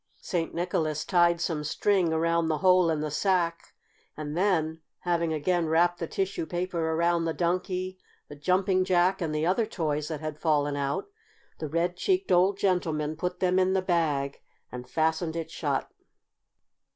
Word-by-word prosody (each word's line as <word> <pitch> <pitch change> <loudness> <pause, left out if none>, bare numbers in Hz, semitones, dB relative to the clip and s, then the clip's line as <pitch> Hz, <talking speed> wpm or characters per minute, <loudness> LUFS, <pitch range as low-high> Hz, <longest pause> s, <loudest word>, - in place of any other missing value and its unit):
St. 170 -4 -2
Nicholas 160 -3 -1
tied 175 -2 +3
some 165 -3 -2
string 180 +3 +1
around 165 +1 +1
the 155 -1 0
hole 185 0 +4
in 155 -2 0
the 155 -1 -3
sack, 170 0 0 0.4
and 150 0 -5
then, 165 -4 +1 0.2
having 170 -2 0
again 165 +2 0
wrapped 170 +2 +2
the 165 - -3
tissue 190 -3 -2
paper 175 -2 -2
around 170 0 +2
the 165 - -2
Donkey, 185 +1 -1 0.3
the 145 - -10
Jumping 185 +4 +2
Jack, 185 +1 +2
and 165 - -1
the 155 +1 0
other 205 +6 +1
toys 155 -7 -2
that 155 -2 -4
had 155 -1 -5
fallen 145 -3 +1
out, 140 0 -2 0.5
the 155 - -4
red 170 +3 0
cheeked 370 - 0
old 185 +2 +4
gentleman 160 -6 0
put 180 +2 -4
them 185 0 +3
in 185 0 +2
the 190 - +2
bag 150 -6 0 0.3
and 125 0 -8
fastened 160 +2 0
it 165 -1 -4
shut. - - -2
170 Hz, 165 wpm, -27 LUFS, 155-185 Hz, 0.5 s, hole